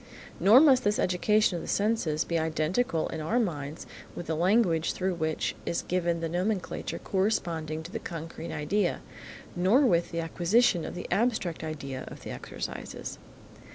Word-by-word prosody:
Nor 220 +7 +8
must 270 -5 +6
this 205 +1 +2
education 185 +1 +2
of - - -5
the - - -8
senses 200 -8 +1
be 170 -1 -1
identical 160 +4 0
in 160 - -4
our 185 +10 0
minds 155 - -3 0.3
with 175 - -6
the 160 - -1
language 175 -1 +2
through 190 0 -1
which 160 -2 -1
is 170 - -2
given 175 -2 0
the 165 - -1
nomenclature 185 +4 -2
corresponding 165 -6 -1
to 170 - -9
the 225 - -4
concrete 165 -3 -7
idea, 170 +5 0 0.5
nor 190 +10 +4
with 175 -11 +3
the 170 - -3
acquisition 175 +3 +2
of - - -6
the 180 - -6
abstract 200 -5 0
idea 140 -4 -5
of - - -10
the - - -6
exercises. - - -6
175 Hz, 160 wpm, -28 LUFS, 160-210 Hz, 0.5 s, Nor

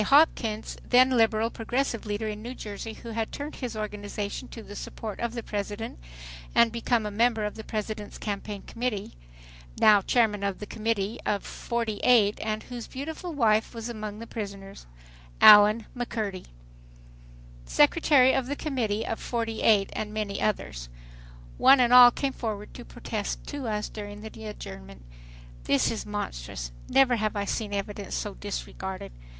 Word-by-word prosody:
H. 210 - -1
Hopkins, 245 -7 +3
then 255 +1 +5
liberal 225 -2 +3
progressive 235 0 -2
leader 210 +1 -2
in 210 0 -5
New 245 +3 -6
Jersey 215 +1 -6
who 230 - -10
had 225 0 -3
turned 290 +2 -6
his 245 -4 -5
organization 210 +2 -4
to 230 - -10
the 205 - -10
support 215 0 -6
of 235 0 -2
the 235 - -4
President 205 - -4 0.6
and 235 -1 +5
become 235 -1 0
a 210 - -3
member 225 +1 +2
of 210 - -3
the 220 - -8
President's 215 -1 -5
Campaign 205 -1 -5
Committee, 230 -4 -3 0.7
now 210 -2 +7
chairman 215 -1 +2
of 200 -1 -1
the 210 - -7
Committee 220 -1 -2
of 205 -1 -1
Fortyeight 230 -2 +1
and 215 0 -2
whose 245 -2 -7
beautiful 320 +6 -6
wife 220 -3 +2
was 230 +1 -5
among 215 -2 -5
the 230 - -7
prisoners, 195 - -7 0.5
Allen 210 +1 +8
McCurdy, 215 -6 -3 1.2
secretary 290 - +5
of 260 -2 0
the 285 - -2
Committee 230 -8 -1
of 225 - -3
Forty 230 -2 -3
eight 205 -3 +4
and 210 -1 -4
many 210 -2 -3
others. - - -2 0.7
One 270 0 +7
and 245 -1 +4
all 250 -1 +11
came 270 +2 -2
forward 210 -4 -5
to 245 - -9
protest 225 -3 -5
to 285 -4 -4
us 210 -1 -1
during 205 -1 -8
the 220 0 -9
adjournment. 65 - -9 0.6
"This 140 - +2
is 225 - -5
monstrous."... - - -5 0.2
"Never 255 -3 +4
have 215 0 -1
I 200 -1 -1
seen 210 0 -2
evidence 200 0 -4
so 210 - -3
disregarded." 190 - -6
220 Hz, 160 wpm, -27 LUFS, 205-235 Hz, 1.2 s, all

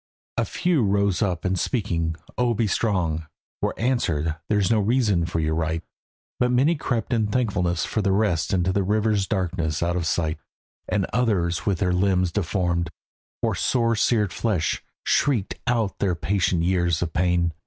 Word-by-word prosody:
A - - +1
few 175 -6 +1
rose 100 -1 +1
up 90 -5 -1
and 95 -1 +1
speaking, 85 -9 -1 0.2
"O 120 -1 +1
be 115 - +1
strong," 90 -7 0 0.3
Were - - -1
answered, 85 - 0
"There's 105 -2 +2
no 110 - +4
reason 105 -6 +2
for 85 -2 -2
your 80 0 0
right," 80 +1 -1 0.6
But 125 -1 +3
many 130 +7 +3
crept 120 -4 -2
in 110 -3 +2
thankfulness 95 -7 0
for 110 - -1
rest 95 -5 +1
Into 95 -1 +1
the 100 - +2
river's 105 0 +1
darkness 85 -5 -1
out 85 +1 0
of 85 -2 -1
sight; 80 -2 0 0.5
And 100 -3 +1
others 90 -9 +1
with 100 -3 +2
their 90 -1 +1
limbs 90 -1 +2
deformed, 85 -3 0 0.5
or - - +2
sore 115 -2 +1
Seared 105 -4 +1
flesh, 90 -10 0 0.2
shrieked 120 -9 +1
out 115 -5 0
their 95 -3 +1
patient 90 -1 0
years 85 -2 +1
of 80 -2 -4
pain. 85 -1 +1
95 Hz, 165 wpm, -24 LUFS, 85-110 Hz, 0.6 s, no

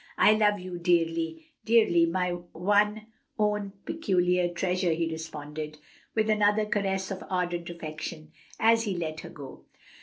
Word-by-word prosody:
"I - - +6
love 210 -1 +3
you 180 -1 -6
dearly, 165 -2 +1 0.2
dearly, 215 -7 +4
my 180 +1 0 0.2
one 210 +4 +2 0.3
own 210 -2 0
peculiar 180 - +1
treasure," 180 0 0
he 165 0 -1
responded, 155 -1 -6 0.4
with 220 -1 +2
another 210 0 +3
caress 195 -2 -1
of 195 - -5
ardent 175 -2 -1
affection, 155 -1 -7 0.3
as 225 +1 +4
he 195 -4 -2
let 160 -2 -3
her - - -8
go. 140 -3 -11
180 Hz, 140 wpm, -28 LUFS, 165-210 Hz, 0.4 s, I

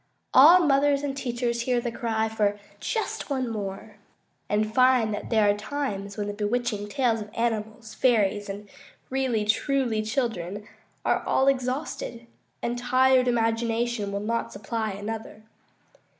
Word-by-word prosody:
All 330 +7 +9
mothers 285 -2 +3
and 275 -1 -2
teachers 240 -3 -2
hear 245 0 +1
the 240 0 -3
cry 225 -1 -1
for 210 -2 0 0.2
"just 445 -8 -3
one 260 -3 -1
more," 205 -1 -6 0.5
and 215 +1 0
find 255 -3 +4
that 205 - -5
there 220 -3 +3
are 205 - +5
times 210 -3 -4
when 205 - -2
the 205 - -4
bewitching 210 0 -2
tales 235 -2 +1
of 210 - -8
animals, 220 -1 -2
fairies, 205 -4 +2
and 205 +1 -6 0.4
"really 255 -5 0
truly" 230 +1 +1
children 215 -4 -3 0.4
are - - +2
all 265 - +2
exhausted, 255 -2 -1 0.4
and 240 +1 -1
tired 255 +1 +4
imagination 230 -2 0
will 200 - -2
not 230 +2 -2
supply 215 +2 -3
another. 215 +1 -6
230 Hz, 140 wpm, -26 LUFS, 210-255 Hz, 0.5 s, All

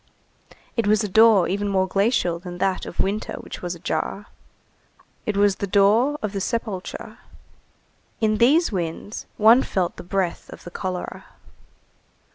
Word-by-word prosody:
It 230 -3 0
was 215 +1 +3
a - - -1
door 215 -2 +5
even 205 +3 -1
more 190 -1 +1
glacial 195 -3 +1
than 175 0 -8
that 190 0 -1
of - - -9
winter 205 +3 -1
which - - -8
was 175 0 -4
ajar. 195 +4 -3 1.0
It 210 -2 -1
was 200 -1 +3
the 200 - -3
door 215 +9 +3
of 215 - -1
the 195 - -2
sepulchre. 210 -4 -4 1.0
In 215 -1 +2
these 295 +8 +4
winds 175 +2 -4
one 225 +4 +6
felt 180 -7 -2
the - - -8
breath 185 -1 -2
of - - -11
the 175 - -9
cholera. 185 0 -5
200 Hz, 150 wpm, -23 LUFS, 185-215 Hz, 1.0 s, one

